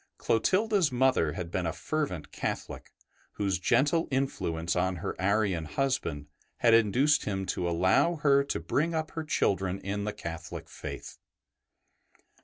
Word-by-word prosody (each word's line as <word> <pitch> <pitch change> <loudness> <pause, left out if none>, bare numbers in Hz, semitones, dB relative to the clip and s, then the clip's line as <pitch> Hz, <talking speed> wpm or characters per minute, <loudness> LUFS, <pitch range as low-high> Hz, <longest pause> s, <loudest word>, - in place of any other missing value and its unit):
Clotilda's 190 - +2
mother 125 - +2
had 85 -2 -5
been 90 -2 -1
a - - 0
fervent 90 - -3
Catholic, - - -5 0.4
whose 95 -3 -1
gentle 150 - +2
influence 85 - -1
on 90 +1 +1
her 80 - -4
Arian 100 -4 +1
husband 105 - -1 0.3
had 115 -1 +4
induced 125 +7 +4
him 95 -2 -2
to 90 -1 -1
allow 95 - +3
her 140 -2 +3
to - - -2
bring 165 +3 0
up 160 0 -2
her 160 - -4
children 95 -10 0
in 100 +1 -3
the 105 - -2
Catholic 85 0 -7
faith. - - -8
105 Hz, 140 wpm, -29 LUFS, 90-140 Hz, 0.4 s, had